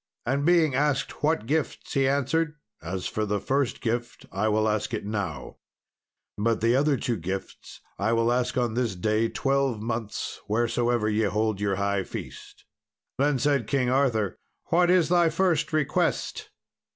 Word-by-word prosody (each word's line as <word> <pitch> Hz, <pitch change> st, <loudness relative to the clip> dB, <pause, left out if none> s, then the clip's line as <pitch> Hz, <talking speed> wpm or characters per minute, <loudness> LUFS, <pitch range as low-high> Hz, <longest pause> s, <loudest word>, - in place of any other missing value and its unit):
And 140 Hz, +5 st, 0 dB
being 165 Hz, -5 st, +4 dB
asked 140 Hz, 0 st, 0 dB
what 155 Hz, -6 st, +1 dB
gifts, 155 Hz, +6 st, -2 dB
he 135 Hz, -2 st, +2 dB
answered, 150 Hz, +3 st, 0 dB, 0.3 s
"As 90 Hz, +3 st, -4 dB
for 110 Hz, -, -2 dB
the 105 Hz, -1 st, -1 dB
first 135 Hz, +5 st, -1 dB
gift 120 Hz, +1 st, -3 dB
I 100 Hz, +3 st, 0 dB
will 110 Hz, 0 st, +2 dB
ask 110 Hz, +2 st, -1 dB
it 105 Hz, -, -5 dB
now, 100 Hz, -10 st, -4 dB, 0.8 s
but 115 Hz, +2 st, +1 dB
the 115 Hz, +2 st, +3 dB
other 140 Hz, +1 st, +3 dB
two 120 Hz, -1 st, -1 dB
gifts 95 Hz, +3 st, -6 dB, 0.2 s
I 105 Hz, +3 st, +1 dB
will 115 Hz, +1 st, +2 dB
ask 125 Hz, +1 st, 0 dB
on 120 Hz, -3 st, +1 dB
this 120 Hz, -4 st, -1 dB
day 110 Hz, +5 st, +1 dB
twelve 135 Hz, -4 st, 0 dB
months, 115 Hz, -1 st, -4 dB
wheresoever 120 Hz, +1 st, +1 dB
ye 110 Hz, 0 st, +1 dB
hold 105 Hz, 0 st, 0 dB
your 100 Hz, -1 st, +1 dB
high 100 Hz, 0 st, 0 dB
feast." -, -, -9 dB, 0.5 s
Then 145 Hz, 0 st, +3 dB
said 140 Hz, -3 st, +1 dB
King 130 Hz, -3 st, +1 dB
Arthur, 120 Hz, -7 st, +1 dB, 0.3 s
"What 175 Hz, +1 st, +4 dB
is 180 Hz, -3 st, +4 dB
thy 175 Hz, -1 st, +4 dB
first 165 Hz, -1 st, +1 dB
request?" 155 Hz, -3 st, 0 dB
120 Hz, 160 wpm, -26 LUFS, 105-140 Hz, 0.8 s, being